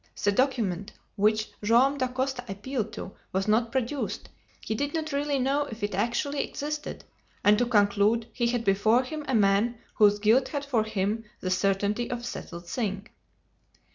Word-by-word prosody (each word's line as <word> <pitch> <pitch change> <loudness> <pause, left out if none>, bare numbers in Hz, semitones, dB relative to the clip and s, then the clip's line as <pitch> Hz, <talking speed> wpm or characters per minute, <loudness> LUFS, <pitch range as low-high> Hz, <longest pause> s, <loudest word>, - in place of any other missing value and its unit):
The 205 - +4
document 205 -6 0 0.2
which 215 +2 +2
Joam 255 +6 +4
Dacosta 255 0 -1
appealed 215 +3 -3
to - - -6 0.2
was 190 +2 -1
not 225 +2 +2
produced; 265 +2 -2 0.3
he - - -3
did 285 +7 -2
not 315 -1 -2
really 285 0 0
know 275 +3 +1
if 220 -1 -8
it 205 - -1
actually 240 +8 0
existed; 300 +1 -5 0.4
and 205 +1 +6
to 245 - +2
conclude, 210 0 +3
he 240 -2 0
had 235 -1 -1
before 215 +5 +4
him 305 +3 -5
a 265 - +1
man 210 +3 +3 0.2
whose 205 -1 +5
guilt 220 +5 +3
had 285 -2 -4
for 235 -6 +1
him 215 +1 -1
the 185 - -3
certainty 200 +4 +1
of 245 -1 -3
a - - -13
settled 175 -7 -7
thing. 200 -2 -3
230 Hz, 170 wpm, -27 LUFS, 205-265 Hz, 0.4 s, and